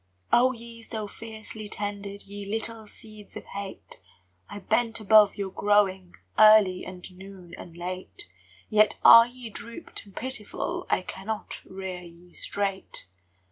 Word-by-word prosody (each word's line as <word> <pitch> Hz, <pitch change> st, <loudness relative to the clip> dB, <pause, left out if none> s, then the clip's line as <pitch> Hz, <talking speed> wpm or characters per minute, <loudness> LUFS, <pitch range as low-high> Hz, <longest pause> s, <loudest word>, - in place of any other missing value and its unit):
Oh, 255 Hz, +2 st, +6 dB
ye 230 Hz, -1 st, -10 dB
so 220 Hz, -2 st, -5 dB
fiercely 220 Hz, 0 st, -8 dB
tended, 205 Hz, -1 st, -5 dB
Ye 200 Hz, +1 st, -8 dB
little 225 Hz, 0 st, -3 dB
seeds 215 Hz, -1 st, -13 dB
of -, -, -9 dB
hate! 200 Hz, -, -8 dB, 0.5 s
I -, -, -7 dB
bent 230 Hz, +3 st, +1 dB
above 215 Hz, -1 st, +6 dB
your 195 Hz, -2 st, -4 dB
growing 190 Hz, -3 st, +1 dB, 0.2 s
Early 215 Hz, -4 st, +7 dB
and 180 Hz, -1 st, -9 dB
noon 190 Hz, -2 st, -12 dB
and 170 Hz, -1 st, -11 dB
late, 185 Hz, -, -5 dB, 0.4 s
Yet 215 Hz, -1 st, +4 dB
are 230 Hz, 0 st, +10 dB
ye 245 Hz, -2 st, -10 dB
drooped 235 Hz, +2 st, -7 dB
and 195 Hz, -, -17 dB
pitiful, 260 Hz, -4 st, -3 dB
I -, -, +1 dB
cannot 210 Hz, +4 st, -6 dB
rear 190 Hz, -1 st, -6 dB
ye 175 Hz, 0 st, -15 dB
straight! 195 Hz, -, -4 dB
205 Hz, 140 wpm, -27 LUFS, 190-220 Hz, 0.5 s, are